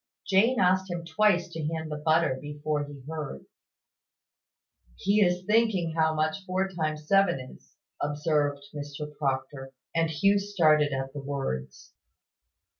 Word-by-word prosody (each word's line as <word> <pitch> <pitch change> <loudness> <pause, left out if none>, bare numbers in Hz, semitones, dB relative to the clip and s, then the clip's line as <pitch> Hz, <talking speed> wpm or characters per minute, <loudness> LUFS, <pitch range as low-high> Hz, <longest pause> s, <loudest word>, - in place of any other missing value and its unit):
Jane 225 +6 +3
asked 185 +1 +3
him 175 -1 -4
twice 175 +2 +2
to 160 - -5
hand 160 -1 -4
the - - -2
butter 155 -2 +2
before 150 0 -3
he 145 -2 -11
heard. 150 - -6 1.5
"He 205 +2 +2
is 180 -1 +2
thinking 210 -6 +2
how 160 -1 +2
much 155 +5 -1
four 190 +1 0
times 155 -4 -3
seven 195 -6 +4
is," 130 0 -13 0.3
observed 145 -1 0
Mr 145 0 -7
Proctor: 135 -1 -3 0.2
and 165 -1 +1
Hugh 195 +6 +3
started 155 -7 +3
at 135 0 -3
the 145 - -5
words. 135 - -5
155 Hz, 135 wpm, -28 LUFS, 145-180 Hz, 1.5 s, seven